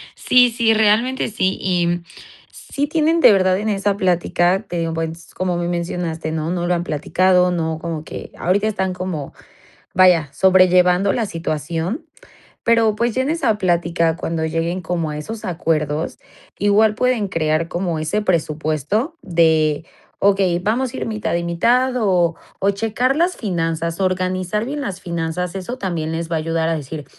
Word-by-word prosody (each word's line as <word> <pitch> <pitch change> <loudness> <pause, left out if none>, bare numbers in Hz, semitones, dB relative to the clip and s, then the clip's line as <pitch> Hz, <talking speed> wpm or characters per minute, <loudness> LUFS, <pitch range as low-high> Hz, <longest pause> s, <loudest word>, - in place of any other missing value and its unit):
Sí, 250 -1 +4
sí, 230 -1 +2
realmente 220 +4 +2
sí 190 -3 0
y 175 -1 0 0.5
sí 285 +1 -4
tienen 320 +2 +2
de - - +8
verdad 185 -1 +3
en 215 +2 -2
esa 200 0 0
plática, 180 +1 +1
te 175 - -3
digo, 165 -1 -2
pues 165 0 -5
como 180 -1 -1
me 175 - -2
mencionaste 170 -2 -3
¿no? 160 +1 -2
No 175 -1 -1
lo 180 - +2
han 175 0 -1
platicado, 180 +3 +2
no 160 -2 -2
como 160 -2 -4
que - - -8
ahorita 200 +4 +1
están 190 -3 -1
como, 180 -6 -5 0.6
vaya, 175 -6 +4
sobrellevando 185 0 +4
la 230 -3 -1
situación, 165 - -3 0.6
pero 230 -2 +3
pues 235 0 -1
ya 260 - +2
en 275 - -2
esa 270 -10 +1
plática 170 -3 +1
cuando 165 -1 -2
lleguen 165 +3 -2
como 165 -2 -2
a 150 - -5
esos 220 +8 -6
acuerdos, 160 -3 -1 0.4
igual 210 +2 +3
pueden 250 -4 +1
crear 155 -1 0
como 175 -2 -2
ese 160 +7 -1
presupuesto 160 - -1
de: 160 -4 +2 0.3
"Okey, 195 -3 +2
vamos 235 +6 -1
a - - -5
ir - - -3
mitad 215 -4 -2
y 170 - -1
mitad". 245 +10 +2
O, 180 -6 +2 0.2
o 195 - +2
checar 225 +6 0
las 345 +4 +1
finanzas, 165 -4 -2
organizar 185 +2 -1
bien 285 +3 -4
las 195 -8 -5
finanzas, 170 +1 -3
eso 195 +7 -5
también 170 -7 -3
les 165 0 -3
va - - +1
a - - 0
ayudar 165 +1 -1
a 165 - +1
decir: 150 0 -6
180 Hz, 170 wpm, -20 LUFS, 165-210 Hz, 0.6 s, de